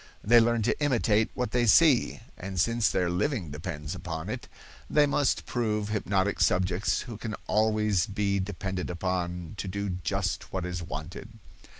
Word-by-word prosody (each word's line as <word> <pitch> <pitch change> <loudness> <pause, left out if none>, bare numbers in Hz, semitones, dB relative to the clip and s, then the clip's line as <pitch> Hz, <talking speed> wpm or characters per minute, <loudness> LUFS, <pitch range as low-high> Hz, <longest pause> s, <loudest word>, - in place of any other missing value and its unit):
They 120 +3 +7
learn 115 -1 +2
to 120 - 0
imitate 110 -6 +2
what 125 -1 -2
they 120 -1 +2
see, 145 +1 +5
and 95 0 -5
since 115 +3 +2
their 90 -2 +1
living 90 - -1
depends 75 +1 -5
upon 90 -1 -5
it, 120 +2 -5 0.4
they 150 -1 +5
must 145 -1 +1
prove 105 -4 -1
hypnotic 100 -2 0
subjects 90 +1 +2
who 120 -4 -7
can 110 0 -4
always 105 -2 +2
be 100 -1 0
depended 95 -1 -4
upon 90 -1 -3
to 95 - -4
do 100 +2 -3
just 95 +3 -2
what 95 -2 -2
is 90 0 -4
wanted. 85 - -7
100 Hz, 160 wpm, -28 LUFS, 90-115 Hz, 0.4 s, They